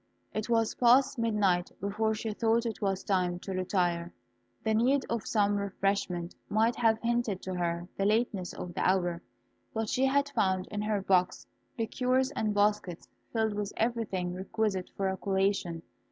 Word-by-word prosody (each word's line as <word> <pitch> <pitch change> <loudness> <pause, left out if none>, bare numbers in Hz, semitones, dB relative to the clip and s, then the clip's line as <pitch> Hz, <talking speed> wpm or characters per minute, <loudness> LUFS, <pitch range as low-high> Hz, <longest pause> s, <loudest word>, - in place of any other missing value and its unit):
It 215 +2 -3
was 225 -2 +2
past 260 +2 +4
midnight 205 -6 +2
before 215 +3 0
she 220 0 -3
thought 230 +2 +1
it 230 - -4
was 195 -2 0
time 180 -3 +1
to 195 - -5
retire. 175 -2 0 0.5
The 220 - +1
need 255 +5 +3
of 230 -2 -2
some 205 -2 +2
refreshment 195 -3 -1 0.2
might 225 +3 +2
have 225 -2 +3
hinted 235 -5 0
to 185 - -4
her 175 -1 -2
the 195 - +1
lateness 210 -4 +1
of 175 - -7
the - - -3
hour; 175 -2 +1 0.5
but 220 -1 -1
she 260 - +2
had 280 +1 +2
found 190 -8 +1
in 210 -1 -2
her 210 -2 -1
box 185 -1 +2 0.3
liqueurs 255 +3 +1
and 215 -6 -1
baskets 205 -4 0 0.2
filled 220 -2 +1
with 205 0 -3
everything 215 -6 -1
requisite 190 0 -2
for 195 - 0
a 190 0 -1
collation. 190 -4 0
205 Hz, 165 wpm, -30 LUFS, 185-225 Hz, 0.5 s, past